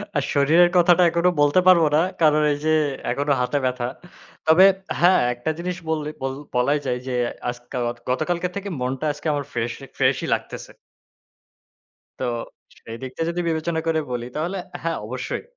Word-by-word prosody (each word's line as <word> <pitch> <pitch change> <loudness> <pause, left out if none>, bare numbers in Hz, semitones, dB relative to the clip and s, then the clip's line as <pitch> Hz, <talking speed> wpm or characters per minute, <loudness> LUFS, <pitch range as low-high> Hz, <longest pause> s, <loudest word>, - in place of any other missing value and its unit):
আর 145 - +1
শরীরের 160 +5 +5
কথাটা 175 +1 +5
এখনো 170 +2 +2
বলতে 145 +5 +4
পারব 175 -3 +7
না। - - +5 0.2
কারণ 155 -1 +4
এই - - -3
যে - - +2 0.4
এখনো 140 +3 -1
হাতে 125 +3 0
ব্যাথা। 125 -1 -1 0.6
তবে 165 +4 +7 0.3
হ্যাঁ, 180 +2 +5
একটা 120 +6 -4
জিনিস 180 +1 -3
বললে, 150 -1 -1
বল 135 0 -2 0.2
বলাই 140 +4 +2
যায় 125 0 -1
যে 130 - -2 0.4
আজকাওয়াক 120 0 -4
গতকালকের 170 +6 -1
থেকে 200 0 -4
মনটা 130 +4 -2
আজকে 150 +2 -7
আমার 145 -2 -2
ফ্রেশ, 120 0 -2 0.2
ফ্রেশই - - +1
লাগতেছে। - - -5 1.5
তো - - -3 0.6
সেই 115 0 -9
দিকটা 130 +5 -6
যদি 175 +1 -2
বিবেচনা 160 +1 -1
করে 160 -1 +2
বলি 120 -1 -3
তাহলে 170 +6 -2 0.2
হ্যাঁ, 165 0 -2
অবশ্যই। 125 - -4
150 Hz, 160 wpm, -22 LUFS, 125-170 Hz, 1.5 s, পারব